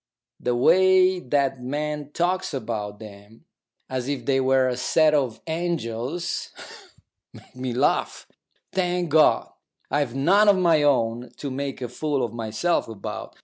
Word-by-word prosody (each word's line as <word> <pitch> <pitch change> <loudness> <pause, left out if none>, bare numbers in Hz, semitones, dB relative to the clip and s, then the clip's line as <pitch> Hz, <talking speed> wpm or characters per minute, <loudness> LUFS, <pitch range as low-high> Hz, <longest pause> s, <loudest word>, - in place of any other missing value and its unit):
The 125 0 -1
way 185 +7 +4
that 135 -2 0
man 150 +2 -3
talks 175 -1 -1
about 110 -4 -4
them, 105 0 -14 0.4
as 130 -1 -4
if 140 -4 -3
they 135 0 +2
were 130 0 +3
a 125 - -1
set 155 +4 +3
of 130 -7 0
angels, 160 -2 -3 0.8
makes - - -17
me 125 0 -4
laugh. 130 - 0 0.5
Thank 180 -3 -1
God, 155 0 +4 0.4
I've 140 -4 0
none 195 +10 +4
of 200 - +5
my 170 -4 +3
own 120 -4 +1
to 140 - -5
make 135 0 -4
a - - -2
fool 140 +1 -1
of 115 - -8
myself 115 +9 -1
about. 110 -3 -7
135 Hz, 145 wpm, -24 LUFS, 120-165 Hz, 0.8 s, of